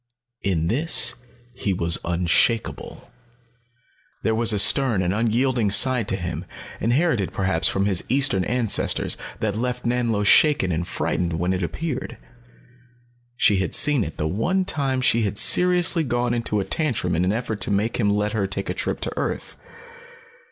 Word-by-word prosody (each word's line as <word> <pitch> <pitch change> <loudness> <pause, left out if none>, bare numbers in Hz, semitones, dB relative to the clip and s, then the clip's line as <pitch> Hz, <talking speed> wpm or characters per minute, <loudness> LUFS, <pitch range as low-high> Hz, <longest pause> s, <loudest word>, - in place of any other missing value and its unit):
In 85 -5 -1
this 125 - +3 0.4
he 100 - -3
was 85 -1 +1
unshakeable. 90 +10 -1 1.1
There 110 - +1
was 115 0 +3
a 105 - 0
stern 115 -1 +3
and 90 +1 -1
unyielding 115 +1 0
side 115 +2 +3
to 95 - -1
him, 90 -3 -5 0.4
inherited 120 - 0
perhaps 95 -4 0
from 95 0 0
his 95 -4 +1
Eastern 125 -7 +2
ancestors, 120 -3 +1 0.3
that 105 -2 -1
left 125 +2 -4
Nanlo 120 -3 -1
shaken 145 - +4
and 85 +1 -3
frightened 85 -1 -2
when 90 +3 -1
it 90 - -3
appeared. 135 - -5 1.2
She 105 - +3
had 95 -2 -1
seen 145 -5 +3
it 80 - -8
the 75 - -2
one 180 - -1
time 135 -6 -1
she 115 -2 +2
had 105 -1 -2
seriously 180 - +4
gone 120 -2 -1
into 115 -3 -1
a 95 - -3
tantrum 120 - -2
in 85 - 0
an 90 - +1
effort 110 -2 -4
to - - +3
make 105 +3 -1
him 105 -4 +1
let 105 +1 0
her 100 -3 -1
take 95 +1 -3
a - - -3
trip - - -3
to - - -3
earth. - - -4
110 Hz, 165 wpm, -22 LUFS, 95-125 Hz, 1.2 s, shaken